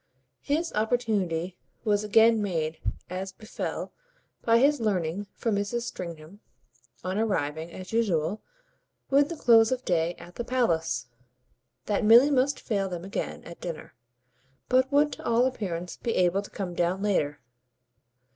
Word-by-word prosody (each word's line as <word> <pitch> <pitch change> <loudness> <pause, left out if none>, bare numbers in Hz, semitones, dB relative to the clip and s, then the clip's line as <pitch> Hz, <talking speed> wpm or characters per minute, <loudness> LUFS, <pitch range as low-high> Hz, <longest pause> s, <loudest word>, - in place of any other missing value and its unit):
His 320 +4 -1
opportunity 210 -7 0 0.3
was 205 -1 +2
again 225 +1 +5
made, 160 -5 -2 0.3
as 185 +1 -5
befell, 215 +3 -5 0.5
by 230 0 +4
his 285 +4 +4
learning 195 -3 -1
from 230 - -1
Mrs. 205 +4 -1
Stringham, 170 -3 -7 0.6
on 185 +3 -2
arriving, 160 -6 -1
as 185 +4 -9
usual, 205 -4 +1 0.7
with 285 +2 +4
the 335 - -4
close 225 -5 +5
of 255 0 -2
day, 170 -1 +1
at 175 - -13
the 240 - -2
palace, 170 - 0 0.8
that 210 +1 0
Milly 235 +7 +7
must 275 +1 +2
fail 200 -3 -1
them 175 -1 -5
again 195 - -4
at 170 - -11
dinner, 165 -3 -6 0.8
but 260 +1 +3
would 295 +1 +4
to - - -9
all 235 +2 +3
appearance 180 -9 -3
be 230 - -2
able 185 +2 +3
to 200 - -11
come 185 -3 -5
down 175 +3 0
later. 150 -8 0
205 Hz, 145 wpm, -27 LUFS, 175-235 Hz, 0.8 s, Milly